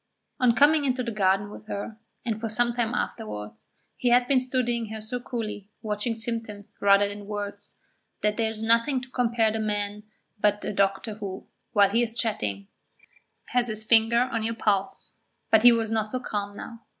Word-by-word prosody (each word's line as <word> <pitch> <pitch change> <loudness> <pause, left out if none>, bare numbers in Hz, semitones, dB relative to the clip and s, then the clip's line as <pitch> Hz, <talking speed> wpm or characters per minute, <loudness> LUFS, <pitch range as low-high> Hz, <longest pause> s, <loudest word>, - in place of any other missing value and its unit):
On 245 -2 +4
coming 295 +3 +5
into 255 -2 0
the 235 - -3
garden 200 -1 +1
with 215 - -11
her, 215 +2 -5 0.3
and 220 -2 -2
for 225 - -2
some 240 +2 +2
time 235 0 -1
afterwards, 105 - -5 0.3
he 245 - 0
had 245 +1 +4
been 270 -1 +4
studying 245 -2 -1
her 220 +1 -6
so 220 +3 -3
coolly, 215 -5 -5
watching 215 +2 -2
symptoms 220 -3 -5
rather 200 0 +5
than 205 0 -8
words, 205 -1 -6 0.5
that 210 0 +1
there 225 0 0
is 220 0 -6
nothing 230 +4 +3
to 255 0 -12
compare 235 -3 +2
the 220 - -2
man 210 -1 -2
to 210 - -34 0.3
but 205 0 +1
a - - -2
doctor 195 +2 +1
who, 200 -3 -7 0.3
while 200 -2 +5
he 230 +3 +3
is 235 -1 -2
chatting, 105 - -2 0.8
has 245 -1 +1
his 215 -1 -4
finger 230 +1 +4
on 240 -2 -1
your 225 +1 -2
pulse. 200 -4 -1 0.4
But 220 - +6
he 245 +1 +9
was 225 -1 0
not 220 -1 0
so 255 - -2
calm 205 -4 -4
now. 230 - -8
220 Hz, 190 wpm, -26 LUFS, 205-235 Hz, 0.8 s, he